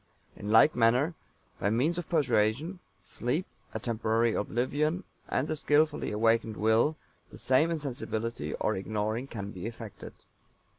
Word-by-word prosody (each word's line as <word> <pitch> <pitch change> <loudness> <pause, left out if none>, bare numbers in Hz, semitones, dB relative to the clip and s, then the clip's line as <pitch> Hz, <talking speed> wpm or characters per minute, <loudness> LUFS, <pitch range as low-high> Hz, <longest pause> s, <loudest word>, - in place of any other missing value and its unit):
In 105 - -6
like 115 +8 +6
manner, 125 +8 +3 0.5
by 100 - +1
means 145 +11 +1
of 175 - -7
persuasion, 150 - +1 0.2
sleep, 125 - -2 0.3
a - - -4
temporary 115 0 +1
oblivion, 145 - 0 0.3
and 140 - 0
the 155 - -1
skillfully 150 0 +2
awakened 115 0 +2
Will, 110 +8 +3 0.4
the - - -11
same 135 +6 +3
insensibility 120 -7 -3
or - - 0
ignoring 110 +5 -2
can 100 -5 -6
be 95 +2 -6
effected. 115 -3 -9
120 Hz, 135 wpm, -29 LUFS, 110-150 Hz, 0.5 s, like